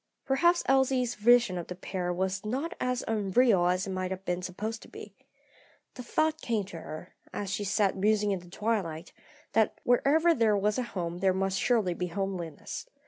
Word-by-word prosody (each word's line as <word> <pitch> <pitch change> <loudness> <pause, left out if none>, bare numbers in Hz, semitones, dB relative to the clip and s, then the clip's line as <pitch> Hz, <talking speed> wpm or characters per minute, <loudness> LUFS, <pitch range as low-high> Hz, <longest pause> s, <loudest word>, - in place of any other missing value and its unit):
Perhaps 345 +6 +3
Elsie's 265 -2 +2
vision 235 -4 +4
of 170 - -6
the 180 - -6
pair 180 -1 -3
was 190 +2 -2
not 270 +11 -2
as 250 0 -1
unreal 210 -2 +3
as 180 +1 +1
it 195 - -4
might 185 0 -2
have 190 0 -6
been 180 -1 -1
supposed 210 +5 -5
to - - -13
be. - - -11 0.8
The - - -8
thought 315 +5 0
came 225 -4 0
to 175 -4 -8
her, 155 +3 -9 0.2
as 200 -1 -4
she 205 - -2
sat 200 0 +1
musing 210 +1 +2
in 195 - -1
the 175 0 -15
twilight, 190 -5 -2 0.4
that 220 -1 +2
wherever 300 +7 +4
there 225 -6 +3
was 210 +4 +1
a 240 -5 -5
home 170 0 -3
there 190 0 +2
must 195 0 0
surely 220 -8 +2
be 180 +1 -3
homeliness. 180 -4 -5
200 Hz, 190 wpm, -29 LUFS, 185-240 Hz, 0.8 s, vision